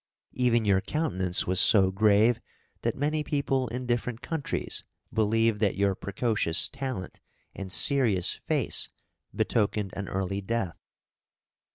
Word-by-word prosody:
Even 120 -3 +1
your 95 -2 +3
countenance 95 - -1
was 95 +1 0
so 100 -4 +6
grave 110 +4 +3 0.4
that - - -1
many 150 +2 -1
people 140 -3 -1
in 125 +3 -5
different 120 0 -3
countries 160 -4 -3 0.3
believed 110 0 +1
that 105 -3 +1
your 100 0 +2
precocious 100 -3 0
talent 130 -9 -6 0.3
and 95 -1 -8
serious 110 -6 +5
face - - -1 0.4
betokened 105 -3 -1
an 100 0 -5
early 95 +1 -3
death. 100 -4 -3
110 Hz, 125 wpm, -27 LUFS, 95-125 Hz, 0.4 s, so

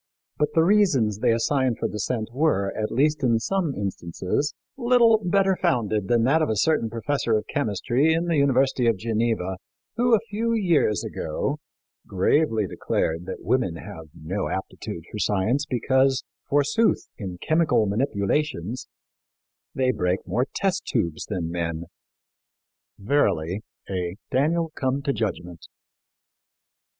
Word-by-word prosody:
But 150 - +1
the 160 - +5
reasons 155 - +3
they - - +3
assign 125 +2 +1
for - - -2
dissent 110 +2 -3
were, 125 -9 +1
at 110 0 -2
least 150 +3 +2
in 120 -4 +3
some 170 +4 -1
instances, 95 - -2 0.2
little 235 -3 +4
better 195 +1 +2
founded 110 - 0
than 120 -1 +3
that 145 +6 +3
of 155 - +1
a 110 - +1
certain 115 0 +2
professor 115 0 0
of 105 - -4
chemistry 120 +8 +1
in 165 +2 +1
the 170 -2 +1
University 135 -3 +3
of 115 -3 +3
Geneva, 110 -3 -1 0.4
who, 240 0 +4
a - - +2
few 230 +3 0
years 170 - +2
ago, - - -3 0.5
gravely 110 - +2
declared 85 -1 -2
that 95 - -6
women 110 -3 +1
have 85 -1 -9
no 90 +6 -3
aptitude 90 -3 -5
for 105 - -5
science 105 +9 +1
because, 130 +1 +2 0.3
forsooth, 145 +10 +2
in 95 -4 -5
chemical 155 - +2
manipulations 110 - -1 0.9
they 130 -1 +2
break 90 -5 -1
more 120 +9 0
test 195 -1 0
tubes 85 -10 -2
than 90 -5 -3
men. 85 -1 -3 1.1
Verily, 100 - 0 0.3
"a 90 -2 -3 0.2
Daniel 160 +5 +1
come 135 0 -1
to 140 -1 0
judgment." 90 - -4
120 Hz, 135 wpm, -24 LUFS, 100-150 Hz, 1.1 s, the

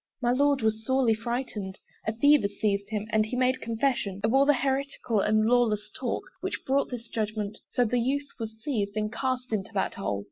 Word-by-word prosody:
My 240 -2 +2
Lord 280 0 +3
was 220 0 +1
sorely 260 -2 +3
frightened; 225 -4 -3 0.3
A 220 - +1
fever 285 -2 +5
seized 200 -1 -1
him, 215 -1 -2
and 220 -1 +4
he 220 +4 -4
made 255 +1 +2
confession 225 -4 -1
Of 220 +2 +2
all 275 +1 +5
the 290 - +6
heretical 265 -3 0
and 215 +2 +3
lawless 230 -3 +2
talk - - -2 0.2
Which - - -4
brought 275 +1 +2
this 240 -2 -6
judgment: 215 -2 -3
so 245 - +2
the 245 +2 +1
youth 280 +4 0
was 220 -1 -6
seized 215 -7 -1
And 215 0 -1
cast 255 -2 -2
into 205 -1 -1
that 190 - 0
hole. 100 - -2
230 Hz, 200 wpm, -28 LUFS, 215-260 Hz, 0.3 s, the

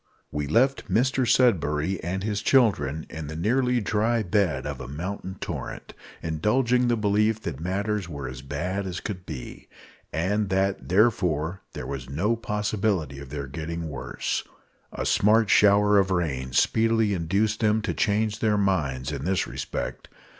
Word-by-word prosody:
We 75 -1 -2
left 130 - +2
Mr 130 +1 +2
Sudberry 90 - +2
and 95 +3 -2
his 105 -1 -1
children 80 - +2
in 80 -1 -7
the 80 - -6
nearly 125 +8 +2
dry 110 +2 +1
bed 100 -3 +1
of - - -4
a - - -7
mountain 90 +6 -5
torrent, - - -6 0.3
indulging 120 +10 +2
the 120 -1 +2
belief 105 +1 +2
that 65 - -5
matters 100 +2 -2
were 70 -4 -5
as 65 -1 -7
bad 90 +8 -3
as 90 0 -4
could 95 -4 -6
be, 65 -6 -8 0.4
and 100 +5 0
that, 95 +1 0
therefore, 90 -4 +2
there - - -6
was 65 -2 -6
no 95 +12 +1
possibility 105 - -1
of 70 -1 -9
their 70 0 -4
getting 80 +3 -5
worse. 70 - -3 0.5
A - - -4
smart 110 +1 +4
shower 105 0 +5
of 95 0 +2
rain 70 -8 -1
speedily 110 - +2
induced 100 +5 0
them 110 -1 +2
to 110 - -1
change 105 +1 0
their 110 -2 +2
minds 75 -9 0
in 70 -2 -4
this 95 +3 +1
respect. - - -5
95 Hz, 155 wpm, -26 LUFS, 80-110 Hz, 0.5 s, shower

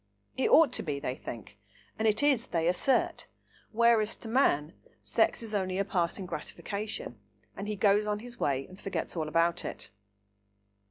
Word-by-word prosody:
It 260 - +1
ought 310 -6 +6
to - - +1
be, 145 -5 -3
they 140 -3 -2
think; 115 -5 -9 0.4
and 220 - +2
it 215 +5 +2
is, 270 -5 +3
they 165 -1 0
assert; 180 +9 +1 0.4
whereas, 230 -1 +3
to - - -10
man, 170 - +2 0.3
sex - - +1
is 220 -1 -7
only 185 -2 -1
a 195 - +1
passing 185 0 -1
gratification, 200 - -5 0.4
and 200 - -6
he 210 - -2
goes 205 +1 +3
on 210 0 0
his 240 +2 -9
way 135 -1 0
and 185 +1 -14
forgets 195 - -3
all 160 -2 -2
about 170 +2 +1
it. - - -7
200 Hz, 170 wpm, -30 LUFS, 165-220 Hz, 0.4 s, ought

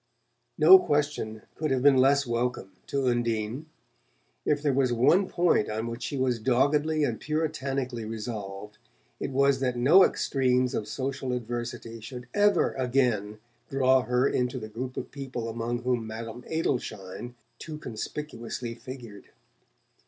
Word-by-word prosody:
No 380 0 +9
question 145 - -1
could 155 -1 -2
have 130 -1 +1
been 140 -1 +7
less 140 +2 +4
welcome 120 -4 -2 0.2
to 140 -1 -1
Undine. 120 +3 -1 0.8
If 145 0 +1
there 145 -2 +2
was 130 -2 +2
one 165 +11 +4
point 175 -10 +2
on 110 +1 -2
which 115 +1 -5
she 120 +4 -3
was 130 -2 +1
doggedly 145 +6 +2
and 120 -6 -1
puritanically 140 -6 -2
resolved, 105 -2 -6 0.4
it - - -3
was 140 0 +3
that 125 -2 -1
no 155 +11 +7
extremes 125 -5 +1
of 105 - -2
social 130 +2 -3
adversity 120 -1 -5
should 125 +3 -8
ever 205 0 +3
again 120 -5 0 0.3
draw 130 -1 +4
her 125 +2 +2
into 125 0 0
the 110 -3 -6
group 125 +4 -6
of - - -5
people 130 -4 -5
among 115 +1 -3
whom 125 -3 0
Madame 115 +2 -7
Adelschein 120 - -3 0.2
too 155 -2 -7
conspicuously 120 -2 -5
figured. 120 -4 -10
125 Hz, 140 wpm, -27 LUFS, 115-140 Hz, 0.8 s, No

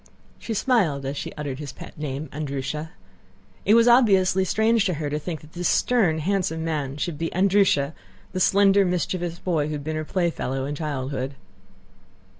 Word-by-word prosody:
She 225 - -4
smiled 195 - +1
as 135 +2 -3
she - - -5
uttered 145 -3 -5
his 145 -3 -6
pet - - -11
name, 145 0 -4
"Andrúsha." 150 +2 -4 0.8
It 210 - +5
was 230 +1 +5
obviously 195 -6 +5
strange 220 +3 +2
to 180 -5 0
her 145 -1 -3
to 150 - -1
think 155 0 -5
that 150 +1 -16
this 175 0 -1
stern 205 -11 +2
handsome 165 -1 -1
man 145 -4 -2
should 155 -1 -3
be 165 0 -1
Andrúsha—the 175 - 0
slender 200 +1 +5
mischievous 175 -1 -1
boy 165 -5 -1
who 155 - -3
had 145 -1 -4
been 155 +1 -3
her 155 - -2
playfellow 155 -6 -1
in 145 - -3
childhood. 140 -3 -3
160 Hz, 170 wpm, -24 LUFS, 145-190 Hz, 0.8 s, It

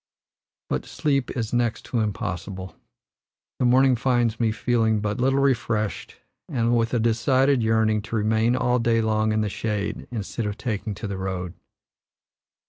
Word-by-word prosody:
But - - -3
sleep 140 -4 0
is 115 -1 -3
next 120 -2 0
to 120 - -1
impossible; 95 -4 -4 0.8
the 125 - +2
morning 130 +1 +5
finds 120 -2 +1
me 115 -2 +2
feeling 110 -1 +1
but 105 +1 -2
little 135 +2 +2
refreshed 115 -6 0 0.3
and 120 -1 +1
with 115 +1 +1
a - - +2
decided 130 +4 +2
yearning 110 -1 +2
to - - -2
remain 110 +2 +2
all 125 0 +1
day 115 0 +2
long 110 -1 +1
in 110 0 +1
the 105 - 0
shade 105 0 -3
instead 110 -1 -4
of 105 0 -4
taking 105 -3 -3
to 105 +2 -5
the 100 -1 -4
road. 90 -2 -4
115 Hz, 155 wpm, -24 LUFS, 105-120 Hz, 0.8 s, morning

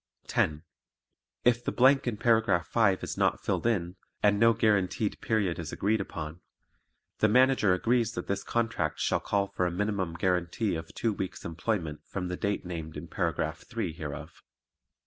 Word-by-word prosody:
10. 75 0 0 0.8
If 120 0 +4
the - - -1
blank 135 +1 +4
in 115 -3 -1
paragraph 110 -7 +2
five 100 -1 +2
is - - -4
not - - +2
filled - - 0
in, 90 -5 -1 0.3
and 105 -1 +4
no 115 +1 +6
guaranteed 105 -2 +1
period 105 -8 0
is 80 -2 -5
agreed 105 +1 +1
upon, 80 -2 -6 0.8
the 110 - +5
Manager 125 -4 +4
agrees 115 +3 +1
that - - -4
this 100 0 -2
contract 85 -10 -1
shall - - +1
call 100 -1 0
for 90 - 0
a - - -2
minimum 95 -2 -1
guaranty 90 +4 0
of 80 -1 -5
two 115 -2 0
weeks' 95 -2 -5
employment 85 -3 -2
from 90 -2 -4
the 90 - -2
date 100 0 -2
named 80 -3 -6
in - - -7
Paragraph - - -1
three 80 - -3
hereof. 75 -2 -7
100 Hz, 165 wpm, -29 LUFS, 85-110 Hz, 0.8 s, no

